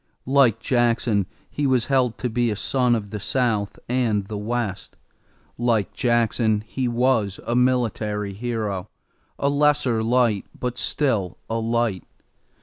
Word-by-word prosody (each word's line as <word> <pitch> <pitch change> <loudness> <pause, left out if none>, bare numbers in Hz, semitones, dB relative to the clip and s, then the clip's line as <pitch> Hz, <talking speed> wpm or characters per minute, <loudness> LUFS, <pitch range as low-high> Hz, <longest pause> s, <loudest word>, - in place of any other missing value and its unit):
Like 130 -5 +4
Jackson 115 -5 +1 0.2
he 145 -1 -1
was 130 -3 +2
held 130 -4 +1
to 125 - -2
be 120 0 0
a 105 - -1
son 125 +3 +1
of 100 -3 -5
the 105 - -4
South 110 -3 0
and 115 -5 +1
the 105 - -6
West. 105 -2 -3 0.6
Like 115 -4 +1
Jackson 115 -3 +1
he 125 +2 -2
was 120 -4 +1
a 120 - -1
military 110 -5 0
hero, 105 -3 -3 0.5
a 140 - 0
lesser 145 -5 +2
light, 115 -3 +2
but 125 -1 -3
still 110 - 0
a 115 - 0
light. 115 -4 0
115 Hz, 140 wpm, -23 LUFS, 105-125 Hz, 0.6 s, Like